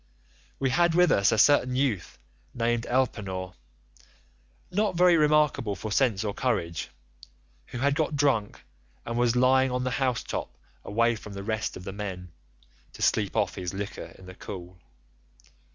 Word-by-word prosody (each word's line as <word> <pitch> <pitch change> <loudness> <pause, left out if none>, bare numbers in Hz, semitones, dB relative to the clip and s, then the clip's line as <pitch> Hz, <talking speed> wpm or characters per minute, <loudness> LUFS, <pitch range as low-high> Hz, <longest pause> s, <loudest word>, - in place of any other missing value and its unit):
We 135 -1 0
had 170 +3 +3
with 180 -1 +5
us 100 -1 +4
a - - +1
certain 125 +1 +4
youth 130 -8 -1 0.4
named 120 0 0
Elpenor, 95 -8 -1 1.2
not 205 0 0
very 180 0 +5
remarkable 150 -8 +2
for 105 +4 -6
sense 110 -4 +2
or 105 -2 -2
courage, 85 - -2 0.8
who - - -7
had 140 +3 +2
got 155 0 -1
drunk 135 -8 0 0.4
and 115 - -4
was 120 0 +2
lying 130 +1 +4
on 125 0 -2
the 130 - -1
house 125 -3 0
top 60 - -5 0.3
away 115 +3 +1
from 105 -1 -10
the 100 0 -6
rest 110 +1 -2
of 90 - -10
the 95 - -6
men, 95 -4 -6 0.6
to - - -6
sleep - - +1
off - - +1
his 90 +1 -5
liquor 100 0 -6
in 95 - -14
the 95 - -10
cool. 90 -1 -9
115 Hz, 160 wpm, -27 LUFS, 100-135 Hz, 1.2 s, with